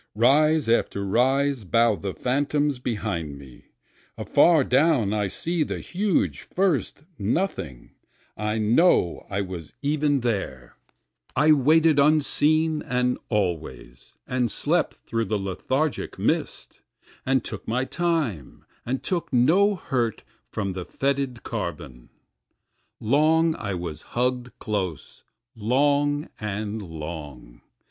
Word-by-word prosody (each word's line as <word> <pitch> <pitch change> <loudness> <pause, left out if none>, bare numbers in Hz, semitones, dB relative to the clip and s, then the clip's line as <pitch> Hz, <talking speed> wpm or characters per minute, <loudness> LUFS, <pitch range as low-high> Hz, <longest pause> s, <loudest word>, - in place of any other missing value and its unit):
Rise 150 +5 +4
after 105 -3 +1
rise 130 +4 +1
bow 115 +3 +3
the 100 -1 -5
phantoms 145 +1 0
behind 85 - -3
me, 65 -3 -14 0.5
Afar 165 -5 +4
down 130 -6 +2
I 105 -2 0
see 165 - -2
the - - -1
huge 200 +2 0
first 180 -6 -1 0.2
Nothing, 95 - -2 0.4
I 105 +1 -2
know 110 - +2
I 100 0 -1
was 90 -5 -7
even 145 -1 +1
there, 95 - -3 0.6
I 150 +1 +4
waited 155 +2 +4
unseen 155 +1 +3
and 125 0 0
always, 85 - -3
and 125 -2 0
slept - - 0
through 115 0 -3
the 110 - -1
lethargic 130 +10 -2
mist, - - -2 0.4
And 130 -2 +1
took 105 - -7
my 125 +4 0
time, 155 - -2 0.2
and 130 +2 -3
took 175 -3 -2
no 170 +12 +4
hurt 120 - -2 0.3
from 100 -3 -3
the 90 -1 -5
fetid 135 -1 -2
carbon. 70 -7 -6 0.9
Long 155 +7 +3
I 100 -3 -4
was 85 -3 -5
hugg'd 125 0 -2
close 95 -7 -4 0.3
long 145 +6 +1
and 105 +1 -4
long. 75 -8 -8
125 Hz, 115 wpm, -24 LUFS, 100-145 Hz, 0.9 s, Rise